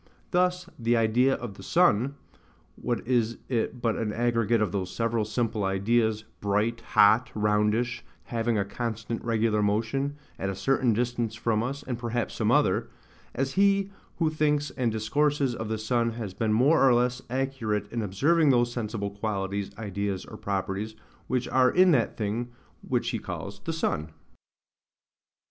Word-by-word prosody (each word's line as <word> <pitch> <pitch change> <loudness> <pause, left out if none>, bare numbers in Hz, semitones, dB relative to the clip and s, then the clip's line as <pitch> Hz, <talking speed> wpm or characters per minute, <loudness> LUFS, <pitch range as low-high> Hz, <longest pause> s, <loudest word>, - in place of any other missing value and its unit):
Thus, 180 0 +1
the 120 0 +2
idea 120 +4 +3
of 120 -5 -6
the - - -13 1.2
sun,—what 120 -2 -2
is 120 -2 +1
it 120 0 -2
but 115 -2 +1
an 110 -2 -1
aggregate 115 0 +1
of 105 - 0
those 95 -3 -2
several 115 -1 -1
simple 110 -1 -1
ideas, 110 +3 +1 0.2
bright, 105 +3 0
hot, 115 +2 +4
roundish, 105 +3 +1 0.2
having 115 -1 -1
a 100 - +1
constant 115 +2 -4
regular 110 -2 +1
motion, 115 +7 0 0.2
at 95 - -1
a 95 - -3
certain 130 +2 +2
distance 120 -1 -1
from 110 -1 0
us, 135 +4 -4
and 120 -2 -4
perhaps 120 -1 -2
some - - 0
other: - - +2 0.5
as 135 +1 -1
he 200 0 +3 0.3
who 160 -2 +1
thinks 150 -2 +1
and 120 -3 -1
discourses 140 +5 +1
of 110 -2 -5
the 110 - -1
sun 115 +1 0
has 110 -5 -5
been 110 +1 -1
more 135 +9 +4
or 130 -3 +6
less 125 +1 +1
accurate 125 -6 -1
in 115 - -2
observing 145 - +2
those 120 -2 +3
sensible 105 -4 -3
qualities, 100 -1 -3
ideas, 100 -2 -3
or - - -10
properties, 100 +2 -3 0.3
which 130 -1 -1
are 130 -1 +4
in 185 0 +5
that 125 -7 +1
thing 115 +3 -2 0.3
which - - -1
he - - -2
calls 100 0 -6
the 165 - -1
sun. 80 - -1
115 Hz, 160 wpm, -27 LUFS, 105-125 Hz, 1.2 s, or